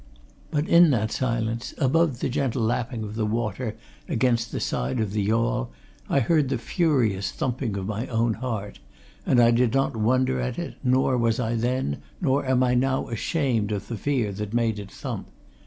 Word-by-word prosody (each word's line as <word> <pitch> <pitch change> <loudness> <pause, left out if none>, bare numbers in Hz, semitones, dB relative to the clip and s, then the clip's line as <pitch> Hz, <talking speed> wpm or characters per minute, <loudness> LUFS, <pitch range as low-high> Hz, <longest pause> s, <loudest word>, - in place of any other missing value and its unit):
But 150 +1 -1
in 170 0 +7
that 110 -5 +1
silence, 115 -1 -2
above 150 -1 +2
the - - 0
gentle 130 -3 0
lapping 115 0 -1
of 105 0 -6
the 110 0 -2
water 110 0 -2 0.3
against 120 -1 +1
the - - -3
side 60 - -1
of 105 -3 -1
the 105 - 0
yawl, 110 - +1 0.4
I 140 - +3
heard 150 +1 +2
the 135 - 0
furious 115 - +1
thumping 125 -5 -2
of 95 - -3
my 110 +4 -3
own 115 -1 +1
heart 110 -4 -4 0.5
and 125 - +4
I 120 0 +6
did 120 +1 +2
not 135 -3 +1
wonder 130 +4 +2
at 125 -1 -2
it, 175 - -4
nor 130 0 +2
was 115 0 +1
I 115 -2 0
then, 120 - -1 0.2
nor 135 +2 +1
am 130 -1 +3
I 125 -1 +2
now 130 +2 +1
ashamed 115 -3 0
of 100 -1 -4
the 120 - -2
fear 120 -2 0
that 105 +2 -5
made 115 -3 +1
it 100 -1 -8
thump. - - -6
120 Hz, 190 wpm, -25 LUFS, 110-130 Hz, 0.5 s, in